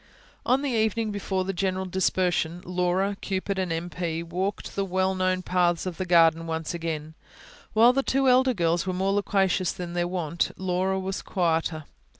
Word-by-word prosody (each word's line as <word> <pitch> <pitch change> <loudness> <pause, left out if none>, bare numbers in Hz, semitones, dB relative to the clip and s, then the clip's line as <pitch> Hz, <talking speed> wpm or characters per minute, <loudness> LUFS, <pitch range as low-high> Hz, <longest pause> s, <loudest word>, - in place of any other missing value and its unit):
On 260 +3 +3
the 280 - -1
evening 220 -1 0
before 195 -2 -2
the 195 - -2
general 190 0 -1
dispersion, 180 -2 0
Laura, 180 +2 0
Cupid, 195 0 -2
and 185 -2 -1
M. 165 +1 -2
P. 170 -1 -3
walked 185 +4 -3
the 200 - 0
well 190 0 0
known 185 0 0
paths 175 -1 +1
of 180 -3 -4
the 185 - -3
garden 165 -1 +4
once 160 0 -3
again. 160 -2 -4 0.6
While 230 +3 +6
the 275 - +2
two 270 0 +1
elder 255 0 +4
girls 170 0 +1
were 185 - 0
more 190 +2 0
loquacious 195 -2 +1
than 175 -1 -6
their 175 0 0
wont, 170 -2 -2
Laura 190 +1 0
was 190 +1 -3
quieter. 165 -3 -1
185 Hz, 175 wpm, -26 LUFS, 170-195 Hz, 0.6 s, While